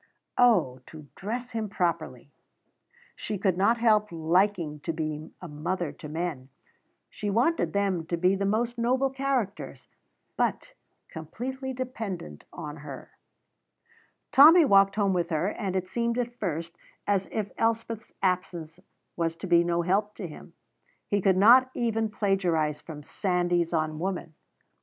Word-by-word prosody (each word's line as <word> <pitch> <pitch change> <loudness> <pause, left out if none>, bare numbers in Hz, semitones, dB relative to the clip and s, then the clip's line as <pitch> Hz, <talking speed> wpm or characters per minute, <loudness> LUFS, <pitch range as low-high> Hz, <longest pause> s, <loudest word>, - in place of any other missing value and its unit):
Oh, 220 - +4
to 155 -2 -11
dress 240 +5 -5
him 220 -2 -3
properly! 165 -8 -2 0.8
She 210 - -4
could 190 -2 +1
not 200 +6 +3
help 215 -3 +3
liking 170 -1 +1
to 165 - -3
be 155 -1 -4
a - - -5
mother 170 +2 -3
to 150 - -10
men; 155 -5 -4 0.6
she 210 - -5
wanted 245 +11 +1
them 195 -5 0
to 170 - -1
be 180 +3 +3
the 195 - -2
most 235 +3 0
noble 260 +3 +1
characters, 265 -6 -3 0.5
but - - -1 0.3
completely 260 - -6
dependent 220 - -6
on 150 -3 -7
her. 140 -3 -9 1.2
Tommy 315 +4 +8
walked 195 -4 +5
home 200 -2 +2
with 175 -2 0
her, 165 +3 0
and 195 -3 -4
it 185 -1 -1
seemed 235 +3 -1
at 240 -1 -2
first 170 -3 -3 0.3
as 195 -2 0
if 210 -2 -3
Elspeth's 225 -1 -1
absence 175 -4 -1 0.4
was 165 -1 -1
to 165 - -8
be 170 -2 +4
no 170 0 0
help 205 +4 0
to 190 - -5
him. 165 +2 -12 0.6
He 205 -1 +1
could 190 0 +3
not 245 +6 +7
even 225 -2 0
plagiarize 180 -8 0
from 150 -3 -9
"Sandys 175 -2 0
on 155 -2 -1
Woman." 180 -2 -3
190 Hz, 145 wpm, -27 LUFS, 165-225 Hz, 1.2 s, Tommy